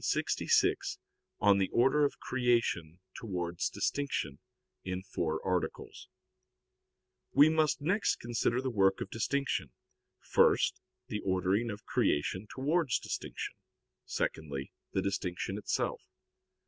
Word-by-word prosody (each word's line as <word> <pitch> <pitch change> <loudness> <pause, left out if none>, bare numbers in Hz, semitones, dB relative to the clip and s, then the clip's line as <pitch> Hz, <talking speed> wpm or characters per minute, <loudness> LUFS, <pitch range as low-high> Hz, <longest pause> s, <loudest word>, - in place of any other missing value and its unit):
_______________________ - - -15
QUESTION - - +2
66 - - +2 0.4
ON 100 -1 +5
THE 95 - +1
ORDER 135 +5 +4
OF 140 - -2
CREATION 115 -10 0 0.2
TOWARDS 90 -5 -2
DISTINCTION 105 - -2 0.4
(In 90 0 -3
Four 85 -4 -2
Articles) 90 -2 -2 1.3
We 150 +2 +7
must 155 -2 +2
next 185 +8 +2
consider 120 +1 0
the 130 - -1
work 95 -3 +3
of - - -5
distinction; 115 - -1 0.5
first, - - +3 0.2
the 105 - -3
ordering 95 +4 +1
of 105 -1 -7
creation 95 +7 0
towards 145 0 +1
distinction; - - -5 0.5
secondly, 70 -4 -3 0.2
the - - 0
distinction 95 0 -2
itself. - - -1
105 Hz, 115 wpm, -32 LUFS, 90-130 Hz, 1.3 s, We